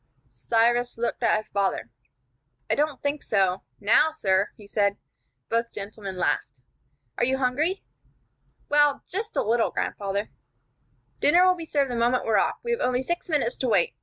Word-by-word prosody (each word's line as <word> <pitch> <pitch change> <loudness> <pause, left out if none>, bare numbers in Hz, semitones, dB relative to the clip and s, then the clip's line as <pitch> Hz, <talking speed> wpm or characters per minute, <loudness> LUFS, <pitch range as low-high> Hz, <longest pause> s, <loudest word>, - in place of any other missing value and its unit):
Cyrus 235 - +1
looked 235 +2 -2
at 230 -2 +3
his 215 - -7
father. 195 - -1 0.8
"I - - +5
don't 295 -2 -1
think 285 +1 -1
so 190 -3 +1 0.2
now, 225 +9 +4
sir," 195 -10 +1
he 210 - -13
said. 200 -1 0 0.5
Both 230 +1 -1
gentlemen 200 -1 -7
laughed. 135 -6 -1 0.6
"Are - - +2
you 260 +2 +2
hungry?" 285 +9 0 0.8
"Well, 295 -1 +3
just 425 +5 -4
a - - +1
little, 230 +2 +2
grandfather." 200 +1 -3 0.9
"Dinner 350 +5 +5
will 370 - +5
be 340 -2 -7
served 280 -4 0
the - - -2
moment 240 +2 +2
we 225 - -2
are 215 - +5
off. - - +1
We 475 - -2
have 470 - -1
only 250 +1 +1
six 345 +5 -3
minutes 280 -6 +1
to 260 - -1
wait. 200 -7 +2
240 Hz, 170 wpm, -25 LUFS, 205-290 Hz, 0.9 s, I